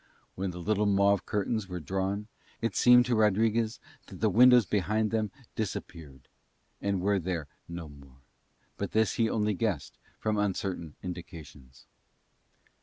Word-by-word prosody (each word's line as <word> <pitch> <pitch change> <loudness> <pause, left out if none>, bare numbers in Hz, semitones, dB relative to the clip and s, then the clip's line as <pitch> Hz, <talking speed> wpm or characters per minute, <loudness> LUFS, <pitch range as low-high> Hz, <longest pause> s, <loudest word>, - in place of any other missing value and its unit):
When 95 +1 -3
the 90 - -7
little 105 +4 +1
mauve 100 0 +3
curtains 105 0 -1
were 90 -1 -4
drawn 95 +6 -2 0.3
it 115 - -2
seemed 125 0 +6
to 125 - 0
Rodriguez 110 +2 +2 0.3
that - - -11
the - - +2
windows 125 -1 +7
behind 105 +2 0
them 110 -2 0 0.3
disappeared 80 - -6 0.5
and 100 -1 0
were 100 +1 +2
there 85 -4 -3 0.2
no 85 -1 -7
more; 70 -2 -16 0.5
but - - -4
this 110 0 +2
he 115 -1 +2
only 105 -1 0
guessed 95 -7 -2 0.2
from 110 -1 -1
uncertain 95 -5 -2
indications. 80 -7 -9
100 Hz, 140 wpm, -29 LUFS, 85-110 Hz, 0.5 s, windows